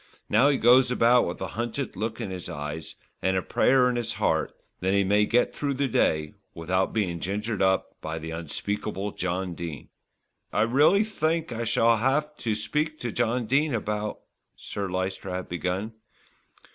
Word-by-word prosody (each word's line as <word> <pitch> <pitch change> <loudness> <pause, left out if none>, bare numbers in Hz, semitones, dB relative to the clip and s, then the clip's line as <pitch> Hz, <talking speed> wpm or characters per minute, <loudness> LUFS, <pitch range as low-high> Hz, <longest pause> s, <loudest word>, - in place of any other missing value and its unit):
Now 125 +7 +5
he 140 - +2
goes 125 +2 +6
about 125 0 +4
with 85 - -5
a - - -3
hunted 120 +3 -3
look 110 +3 -3
in 110 -5 -4
his 90 -2 -6
eyes, 75 +2 -6 0.3
and 95 +1 +1
a 95 - -1
prayer 130 -1 +3
in 125 -1 0
his 120 - -2
heart - - 0 0.3
that 95 +2 +1
he 100 - +4
may 105 +2 +3
get 120 +1 +2
through 140 -2 -2
the 140 +1 0
day 75 - +1 0.2
without 90 +3 0
being 90 -6 -1
gingered 105 +4 -2
up 95 0 +1
by 80 +1 -4
the 80 0 -6
unspeakable 100 +5 -3
John 95 0 -2
Dene." 85 -4 -7 0.6
"I 105 - +2
really 145 - +4
think 165 -6 -1
I 115 0 -3
shall 115 0 +3
have 145 +6 +1
to 110 -3 -1
speak 150 +9 -1
to 120 - -2
Mr. 120 0 0
Dene 140 +2 +2
about 105 -1 -3 0.2
" - - -54
Sir 100 -2 -5
Lyster 95 +1 -3
had 90 0 -4
begun. 90 +5 -3
105 Hz, 180 wpm, -26 LUFS, 95-125 Hz, 0.6 s, goes